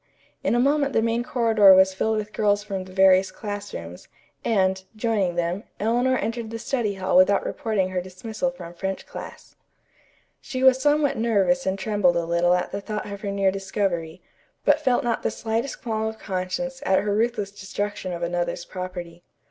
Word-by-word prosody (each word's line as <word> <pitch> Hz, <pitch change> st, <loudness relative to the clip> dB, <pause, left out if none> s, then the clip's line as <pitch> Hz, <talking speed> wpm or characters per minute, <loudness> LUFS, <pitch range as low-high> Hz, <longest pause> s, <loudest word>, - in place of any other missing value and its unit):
In -, -, +2 dB
a -, -, +3 dB
moment 280 Hz, +2 st, +2 dB
the 225 Hz, -, +3 dB
main 230 Hz, +1 st, +1 dB
corridor 225 Hz, -5 st, +5 dB
was 190 Hz, 0 st, +5 dB
filled 220 Hz, +3 st, 0 dB
with 210 Hz, 0 st, -4 dB
girls 205 Hz, -1 st, +2 dB
from 195 Hz, -3 st, -4 dB
the 185 Hz, -, -12 dB
various 190 Hz, 0 st, +5 dB
classrooms, 205 Hz, -, -7 dB, 0.4 s
and, 190 Hz, -3 st, +1 dB
joining 215 Hz, -5 st, 0 dB
them, 175 Hz, +4 st, -1 dB, 0.2 s
Eleanor 245 Hz, +4 st, +2 dB
entered 230 Hz, -1 st, -3 dB
the 230 Hz, -, -5 dB
study 225 Hz, -3 st, -1 dB
hall 190 Hz, -1 st, -1 dB
without 185 Hz, +2 st, +5 dB
reporting 215 Hz, -8 st, -1 dB
her 185 Hz, -1 st, -2 dB
dismissal 215 Hz, +8 st, -4 dB
from 175 Hz, -10 st, -10 dB
French 190 Hz, +2 st, -4 dB
class. -, -, -10 dB, 0.9 s
She 260 Hz, -3 st, -4 dB
was 260 Hz, 0 st, +6 dB
somewhat 295 Hz, 0 st, +2 dB
nervous 230 Hz, +3 st, +2 dB
and 190 Hz, +1 st, 0 dB
trembled 195 Hz, -3 st, +2 dB
a 170 Hz, -1 st, 0 dB
little 170 Hz, +1 st, +3 dB
at 180 Hz, -, -2 dB
the 200 Hz, -, -4 dB
thought 210 Hz, +1 st, -4 dB
of 200 Hz, 0 st, -7 dB
her 205 Hz, -, -3 dB
near 195 Hz, -1 st, +2 dB
discovery, 190 Hz, -4 st, -3 dB, 0.4 s
but -, -, +4 dB
felt 250 Hz, -2 st, +2 dB
not 240 Hz, -2 st, 0 dB
the -, -, 0 dB
slightest 230 Hz, +4 st, -3 dB
qualm 220 Hz, -2 st, -1 dB
of 220 Hz, 0 st, -5 dB
conscience 220 Hz, +9 st, -4 dB
at 190 Hz, -8 st, +3 dB
her 205 Hz, -1 st, 0 dB
ruthless 215 Hz, -2 st, 0 dB
destruction 205 Hz, 0 st, -4 dB
of 170 Hz, -1 st, -4 dB
another's 175 Hz, 0 st, -2 dB
property. 175 Hz, -2 st, -7 dB
205 Hz, 180 wpm, -24 LUFS, 185-230 Hz, 0.9 s, was